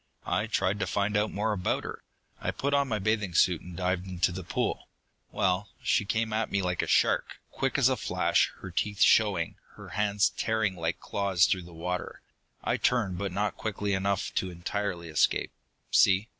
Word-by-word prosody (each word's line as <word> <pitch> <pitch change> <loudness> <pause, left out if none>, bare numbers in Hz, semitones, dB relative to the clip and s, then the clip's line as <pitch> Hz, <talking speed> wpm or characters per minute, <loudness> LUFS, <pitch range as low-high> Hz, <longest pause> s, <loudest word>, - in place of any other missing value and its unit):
"I 105 - 0
tried 100 -2 0
to - - -1
find 100 +1 0
out 105 +1 +2
more 105 +2 0
about 90 -3 -1
her. - - -7 0.4
I - - -2
put 140 +1 -1
on 140 -1 +3
my 110 -4 0
bathing 105 -3 -1
suit 90 -1 +4
and 90 -1 -10
dived 90 0 -1
into 90 -1 +1
the 95 +1 -6
pool. - - -2 0.4
Well, 95 +1 0
she 105 - +2
came 110 0 -1
at 110 0 0
me 100 -1 0
like 90 -1 0
a - - -3
shark, - - +2
quick - - -1
as - - +5
a - - +2
flash, - - +1
her 90 - -7
teeth 100 +3 -2
showing, 100 -7 +4 0.2
her 105 -3 -11
hands 100 +1 +1
tearing 110 -4 0
like 85 -1 -2
claws 95 -3 +2
through 90 -2 0
the 90 - -12
water. 90 +2 -4 0.4
I - - +1
turned, 100 -8 +1
but 100 -2 -2
not 105 +3 -1
quickly 105 -1 -2
enough 100 0 -1
to 95 - 0
entirely 90 0 -3
escape. 80 -2 +1 0.4
See?" 100 +3 +4
100 Hz, 190 wpm, -28 LUFS, 90-105 Hz, 0.4 s, as